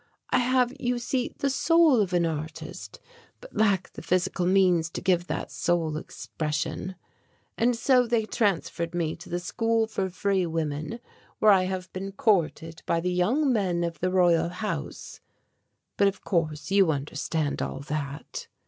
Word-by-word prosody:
I 255 - +4
have, 250 0 +2
you 245 0 0
see, 245 +1 -2
the 280 - 0
soul 320 -4 +4
of 195 -3 -1
an 175 -1 +2
artist 160 0 -6 0.4
but - - -14
lack 200 -4 +1
the - - -8
physical 180 0 0
means 180 -3 +3
to - - -5
give 180 -1 +1
that - - -4
soul 170 -3 0
expression. 155 +3 -4 0.6
And 240 +1 +2
so 250 +1 +3
they 230 -2 +1
transferred 175 -6 -1
me 165 -2 -1
to 175 - -12
the 175 - -1
school 225 +5 0
for 195 -3 -2
free 190 0 0
women, 160 +5 -3 0.4
where 215 - +6
I 185 -2 +4
have 185 -1 -4
been 195 +1 -5
courted 165 -5 0
by 170 - +2
the 180 +2 -1
young 255 +11 +2
men 180 -6 0
of 165 -2 -3
the 185 - 0
Royal 175 -2 +3
House. 210 +4 -5 0.8
But 200 - +5
of 195 - -3
course 160 -1 -1
you 195 -4 +5
understand 145 +1 -2
all - - -4
that." 145 -1 -5
185 Hz, 160 wpm, -27 LUFS, 165-220 Hz, 0.8 s, where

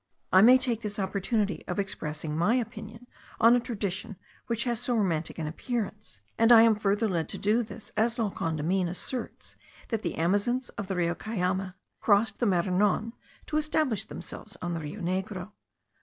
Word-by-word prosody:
I 185 - +8
may 250 +4 +8
take 245 -3 -1
this 210 -2 -4
opportunity 200 +1 -1
of - - -3
expressing 155 -6 -3
my 175 +9 +3
opinion 225 -1 -5 0.3
on 230 +2 +7
a - - +3
tradition 205 -5 -4 0.3
which 235 -1 0
has 240 -3 -1
so 245 0 0
romantic 170 -7 0
an 160 - -3
appearance; 200 - -4 0.2
and 230 +1 +5
I 225 -1 +10
am 230 -1 +6
farther 210 +1 +1
led 170 -5 -1
to - - -6
do 215 +4 +2
this 220 -1 -8
as 225 +2 +1
La 220 -4 0
Condamine 165 +4 -1
asserts 210 +8 -5 0.3
that 225 -3 -1
the - - -3
Amazons 205 +9 +1
of 200 - -6
the 190 - -2
Rio 170 -1 +1
Cayame* 185 -2 -2 0.2
crossed 205 -1 +2
the 240 - +2
Maranon 195 +4 +1 0.3
to 305 - -1
establish 300 -7 +1
themselves 215 - -8
on 175 -1 -3
the 165 - -2
Rio 155 +7 -7
Negro. 185 +3 -3
205 Hz, 175 wpm, -28 LUFS, 185-230 Hz, 0.3 s, I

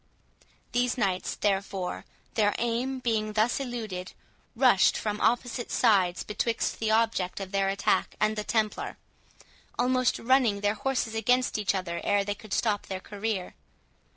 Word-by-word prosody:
These 245 +1 +1
knights, 195 -5 0
therefore, 195 -2 -2 0.3
their 210 -2 +2
aim 245 +3 -1
being 215 -3 0
thus 220 +4 +2
eluded, 220 -8 -5 0.4
rushed 240 -6 +5
from 210 -1 -3
opposite 240 +1 0
sides 190 -7 +3
betwixt 225 +2 -1
the 220 - 0
object 220 -5 +1
of 190 -1 -6
their 195 -1 +1
attack 195 - 0
and 215 0 +2
the 210 - -2
Templar, 215 -1 -1 0.8
almost 255 0 +2
running 235 -5 +2
their 205 0 +2
horses 230 0 -1
against 245 +1 +1
each 205 -1 +1
other 170 -2 -3
ere 205 0 +2
they 205 +1 -2
could 210 0 -14
stop 210 -2 0
their 190 -1 -4
career. 205 -1 -4
215 Hz, 145 wpm, -28 LUFS, 200-240 Hz, 0.8 s, rushed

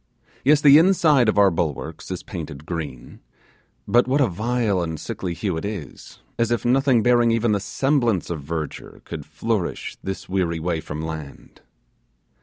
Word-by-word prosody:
Yes, 150 +2 +4
the 145 0 +8
inside 160 - +4
of 105 - 0
our 100 -2 +6
bulwarks 80 -1 -3
is 90 -2 -5
painted 75 -6 -7
green; 80 -8 -6 0.7
but 120 +1 +4
what 135 +3 +2
a 140 - +5
vile 110 0 0
and 80 -2 -4
sickly 90 -3 -4
hue 95 -2 -2
it - - -5
is, 100 - -7 0.2
as 115 -1 +2
if 120 -2 -1
nothing 130 -2 +3
bearing 120 -1 +4
even 115 0 +2
the 100 - +2
semblance 120 - 0
of 80 -3 -4
verdure 80 +1 -6
could 75 -2 -7
flourish 95 +5 -3
this 95 0 -5
weary 90 -3 -1
way 80 -1 -2
from 75 +1 -6
land. 80 -3 -8
95 Hz, 165 wpm, -23 LUFS, 80-120 Hz, 0.7 s, the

